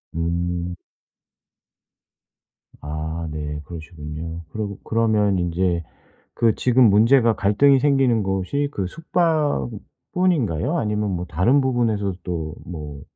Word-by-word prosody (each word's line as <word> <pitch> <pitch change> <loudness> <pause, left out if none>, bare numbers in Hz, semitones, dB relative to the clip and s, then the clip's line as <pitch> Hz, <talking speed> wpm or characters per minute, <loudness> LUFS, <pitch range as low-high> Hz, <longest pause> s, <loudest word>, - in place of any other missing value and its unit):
음. 85 +1 -2 2.1
아. 80 +2 -4
네 75 -1 -4
그러시군요. 80 0 -7
그러고 100 -1 -5
그러면 110 -3 +2
인제 85 0 0 0.5
그 115 -2 +3
지금 125 -2 +4
문제가 115 +3 +5
갈등이 135 +8 +4
생기는 135 -6 +3
곳이 95 +10 -1
그 95 -2 -2
숙박뿐인가요? 155 - -1
아니면 105 -1 -1
뭐 90 0 -3
다른 95 - +3
부분에서도 110 -7 0
또 80 -4 -4
뭐 75 -5 -7
100 Hz, 230 characters per minute, -22 LUFS, 85-120 Hz, 2.1 s, 문제가